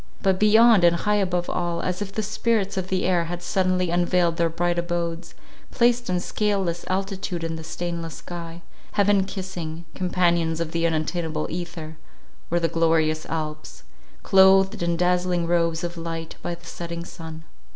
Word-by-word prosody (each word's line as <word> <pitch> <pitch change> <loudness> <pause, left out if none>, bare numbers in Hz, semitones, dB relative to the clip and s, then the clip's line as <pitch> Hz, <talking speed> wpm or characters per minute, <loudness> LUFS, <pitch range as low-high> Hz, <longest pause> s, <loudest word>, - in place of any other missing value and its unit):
But 190 -1 +2
beyond, 220 -1 +6
and 170 0 +6
high 210 +4 +1
above 180 -2 -1
all, 170 -1 -2
as 180 +2 -2
if 200 -1 -3
the 215 +2 -2
spirits 215 -1 0
of 190 -1 -2
the 185 0 0
air 175 -2 +2
had 175 +1 -5
suddenly 185 -1 +1
unveiled 175 -1 +2
their 170 -1 +2
bright 175 +1 0
abodes, 170 -1 -3 0.3
placed 240 -1 +2
in 180 -1 +1
scaleless 190 -3 -1
altitude 190 -2 -2
in 165 0 -2
the 160 - -7
stainless 170 -1 -4
sky, 170 -1 -8 0.3
heaven 200 -1 +3
kissing, 175 -4 -6
companions 170 -3 +1
of 165 -1 -2
the 170 0 +1
unattainable 160 -1 -1
ether, 165 -2 -6 0.5
were 175 - +2
the 165 - +1
glorious 160 -1 +1
Alps, 155 -1 -5 0.4
clothed 195 +1 +5
in 170 -1 0
dazzling 180 0 +1
robes 170 0 +1
of 175 0 -4
light 165 -1 -5
by 175 - -3
the 170 +1 -20
setting 170 0 -6
sun. 160 -2 -9
175 Hz, 160 wpm, -24 LUFS, 165-185 Hz, 0.5 s, beyond